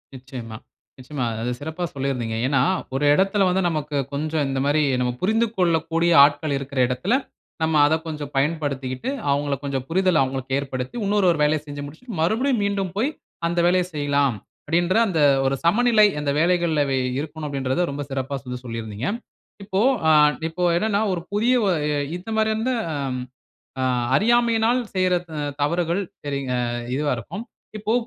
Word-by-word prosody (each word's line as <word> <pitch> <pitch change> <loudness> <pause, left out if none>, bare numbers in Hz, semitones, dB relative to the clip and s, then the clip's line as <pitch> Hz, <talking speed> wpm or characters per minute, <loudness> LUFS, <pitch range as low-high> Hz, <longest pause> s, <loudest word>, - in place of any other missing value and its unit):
நிச்சயமா, 125 -4 -8 0.4
நிச்சயமா. 130 0 -4
அ - - -5
அத 125 - -1
சிறப்பா 160 +4 -5
சொல்லியிருந்தீங்க. 125 -5 -2
ஏன்னா, 140 0 +2 0.3
ஒரு 140 +2 +1
இடத்தில 195 +4 +3
வந்து, 190 +1 +1
நமக்கு 150 -2 -3 0.2
கொஞ்சம் 155 +1 -1
இந்தமாரி 140 +3 +1 0.2
நம்ம 125 0 +1
புரிந்து 220 +4 +2
கொள்ளக்கூடிய 165 -1 +2
ஆட்கள் 145 0 +2
இருக்கிற 140 0 -5
இடத்தில, 150 - -1 0.5
நம்ம 160 0 +1
அத 155 - +2
கொஞ்சம் 150 -3 -5
பயன்படுத்திக்கிட்டு, 140 - -1 0.2
அவுங்கள 145 0 0
கொஞ்சம் 135 -2 -3
புரிதல 185 -2 +3
அவுங்ளுக்கு 130 0 -3
ஏற்படுத்தி, 130 - -5
இன்னொரு 200 -1 +2
ஒரு 165 - -2
வேலைய 150 0 +2
செஞ்சு 145 0 -6
முடிச்சிட்டு, 180 - -8
மறுபடியும் 225 +7 +1
மீண்டும் 195 -3 -1
போய் 245 +7 +2 0.4
அந்த 170 +1 -1
வேலைய 180 +1 +3
செய்யலாம். 145 -3 +1 0.3
அப்பிடின்ற 175 +5 +1
அந்த 175 -5 -1 0.3
ஒரு 135 +1 +2
சமநிலை 215 +4 +5
அந்த 145 -1 -1
வேலைகள்ல 170 -3 +2
அவை 135 -1 0 0.2
இருக்கணும் 155 +1 -6
அப்பிடின்றத 135 +3 -1
ரொம்ப 140 +1 -4
சிறப்பா 135 0 -3
வந்து 125 0 -5
சொல்லியிருந்தீங்க. 115 0 -5 0.6
இப்போ 195 -1 -2 0.3
ஆ - - +6 0.4
இப்போ 180 +2 -4
என்னன்னா, 205 +3 +1
ஒரு 175 - -3
புதிய 225 +5 +2
ஒ - - +2
அ 150 0 -1 0.3
இந்த 180 +5 -10
மாரி 220 0 +2
அந்த 235 +4 0 0.2
அம். 135 -3 -2 0.6
அ - - 0 0.3
அறியாமையினால் 235 - +3
செய்ற 185 -1 +2
த - - -12 0.3
தவறுகள் 170 +4 +1 0.2
சரிங் 140 -2 -3
அ - - 0 0.4
இதுவா 145 +1 0
இருக்கும். 200 - -7 0.3
இப்போ 215 +1 -1
155 Hz, 160 wpm, -23 LUFS, 140-185 Hz, 0.6 s, ஆ